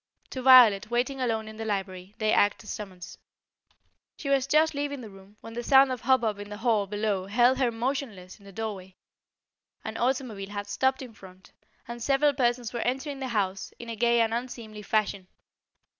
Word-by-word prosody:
To 260 - -5
Violet 245 -7 +7
waiting 255 +3 -1
alone 225 -3 -1
in 220 0 -10
the 225 - -5
library, 195 -2 -4
they 215 -1 +1
acted 205 +2 +2
as 215 - -7
a - - -3
summons. 185 -4 -9 1.0
She 280 - -5
was 275 -1 +2
just 310 +2 +3
leaving 285 -1 -3
the 220 -3 -10
room, 195 +2 -17
when 225 - -10
the 240 - -4
sound 270 +2 +5
of 250 -3 -4
hubbub 235 -5 +1
in 205 0 -8
the 205 - -7
hall 220 -3 +1
below 205 -2 -2
held 245 +5 +3
her 255 -3 +2
motionless 230 -6 -4
in 200 - -19
the 200 - -12
doorway. 195 -3 -6 0.9
An 220 0 -5
automobile 240 -6 -2
had 205 0 -5
stopped 265 +6 0
in 245 -3 -11
front, 190 -3 -16 0.4
and 235 0 -7
several 280 +3 +2
persons 240 -3 0
were 235 - -3
entering 270 +3 -2
the 265 - -4
house, 195 -5 -2
in 235 - -9
a 230 - -4
gay 235 +1 +3
and 225 0 +1
unseemly 230 -3 -6
fashion. 200 -2 -1
225 Hz, 195 wpm, -27 LUFS, 205-255 Hz, 1.0 s, Violet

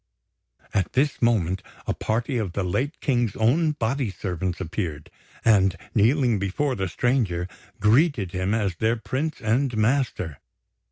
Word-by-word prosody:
At 95 -3 0
this 140 +2 +1
moment, 95 -6 +2 0.2
a - - 0
party 120 +3 -1
of 100 -6 -3
the 100 - -1
late 130 - -1
King's 120 -7 +1
own 150 +8 +2
body 130 -2 -1
servants 90 -1 -3
appeared, 85 -4 -4 0.3
and, 95 -4 +4 0.2
kneeling 120 0 +3
before 100 +9 0
the 95 -5 -2
stranger, 95 -4 0 0.3
greeted 110 - +3
him 95 +3 0
as 100 -5 0
their 110 +4 +2
prince 135 +6 -3
and 120 +2 +1
master. 110 - 0
110 Hz, 135 wpm, -25 LUFS, 95-130 Hz, 0.3 s, and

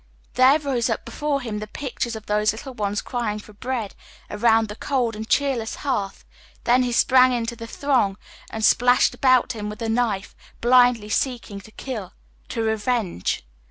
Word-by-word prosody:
There 260 +3 +6
rose 265 -6 -1
up 225 - -2
before 280 +4 -2
him 220 -4 -4
the 215 - -6
pict 255 +4 -4
ure 230 -1 -5
of 215 - -12
those 210 0 +1
little 260 +4 -8
ones 205 -2 -2
crying 235 -4 -2
for 210 0 -12
bread 230 -1 -4 0.4
around 225 +1 +3
the 210 - -7
cold 245 -3 -1
and 220 +2 -7
cheerless 255 -4 0
hearth 200 -8 -2 0.2
— - - -29
then 245 +2 +4
he 250 -1 0
sprang 255 +1 +5
into 235 -1 -2
the 230 0 -8
throng 240 -7 0 0.3
and 220 -1 -1
slashed 245 +1 +4
about 255 -1 +3
him 210 -2 -5
with 210 - -8
a 225 - -2
knife, 225 -4 -1 0.2
blindly 245 -3 +4
seeking 230 -5 -2
to 215 - -16
kill, 215 -6 -6 0.4
to 230 - -2
revenge. 220 - -1
230 Hz, 180 wpm, -23 LUFS, 210-255 Hz, 0.4 s, There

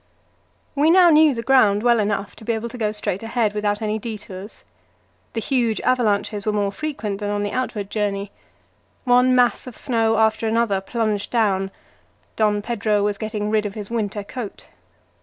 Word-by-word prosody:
We 290 +2 +3
now 350 0 +7
knew 305 -3 +5
the 230 - -4
ground 215 -6 +4
well 240 -1 +4
enough 205 -1 -2
to - - -12
be 230 - -1
able 225 +1 -3
to 245 - -9
go 215 -2 0
straight 210 -3 -2
ahead 225 -2 0
without 210 0 -1
any 215 0 -1
detours. 205 -3 -8 0.7
The 230 - -2
huge 235 -2 0
avalanches 210 -4 +1
were 215 - 0
more 205 -1 0
frequent 210 -6 -4
than 205 -1 -3
on 205 0 -1
the 205 - -2
outward 215 -6 -3
journey. 200 -2 -2 0.7
One 250 0 +4
mass 245 -1 +2
of 250 - -9
snow 225 -3 +1
after 220 0 +2
another 220 -3 +1
plunged 215 -1 -2
down; 195 -5 +1 0.7
Don 210 -1 +1
Pedro 215 -3 0
was 205 -1 -1
getting 215 -1 -3
rid 215 -1 +1
of 200 - -9
his 210 0 -7
winter 210 -3 -2
coat. 220 0 -8
215 Hz, 175 wpm, -22 LUFS, 205-235 Hz, 0.7 s, now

